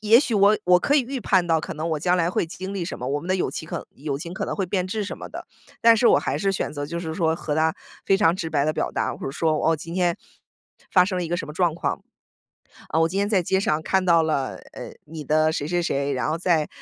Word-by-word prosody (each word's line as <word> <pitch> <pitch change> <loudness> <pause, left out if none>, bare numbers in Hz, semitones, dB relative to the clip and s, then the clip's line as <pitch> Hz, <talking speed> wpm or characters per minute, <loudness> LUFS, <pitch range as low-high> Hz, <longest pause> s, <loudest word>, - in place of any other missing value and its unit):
也 220 +2 +6
许 240 -6 -1
我 205 +1 +5
我 180 0 +6
可 290 - +2
以 - - +5
预 260 +1 -5
判 185 -4 +2
到 165 -1 +2
可 - - -6
能 160 +2 -3
我 155 - 0
将 180 +3 +2
来 170 -1 +1
会 - - 0
经 190 +4 -7
历 180 -3 -2
什 180 - -6
么， 125 - -5
我 145 +1 -1
们 175 - -9
的 185 - +2
友 - - 0
情 160 - -7
可 - - -5
友 140 -1 -4
情 170 +3 -7
可 - - -3
能 - - -3
会 195 -2 -1
变 180 0 -1
质 210 +2 -2
什 - - -6
么 - - -8
的。 - - -8 0.3
但 230 0 +6
是 235 - +3
我 - - +5
还 - - -2
是 195 - +1
选 185 - -2
择 145 -1 -4
就 170 +2 -4
是 160 -2 -4
说 165 -2 +1
和 150 -3 -3
她 160 +1 +2 0.3
非 195 - +3
常 170 -4 +3
直 165 -3 -4
白 145 -2 +1
地 155 - +1
表 - - -2
达， - - -2
或 - - -7
者 - - -2
说， 155 +2 0 0.2
哦， 165 - +3
今 165 +3 -8
天 175 -2 +1 0.8
发 180 -2 +6
生 185 -1 -2
了 175 - -1
一 - - -5
个 175 - 0
什 - - -4
么 150 - -8
状 175 -1 +1
况。 - - -2 0.9
啊， 160 - +1
我 165 - +3
今 190 - -5
天 200 - +2
在 195 -5 +2
街 190 +3 +1
上 155 -4 0
看 190 +1 +1
到 170 -2 +5
了， 145 -4 -1 0.2
呃， - - -8
你 155 -1 -8
的 155 +2 +3
谁 145 - -2
谁 175 +2 0
谁， 140 -3 -1
然 130 +3 -1
后 160 - 0
在 165 -4 +1
170 Hz, 315 characters per minute, -24 LUFS, 155-190 Hz, 0.9 s, 也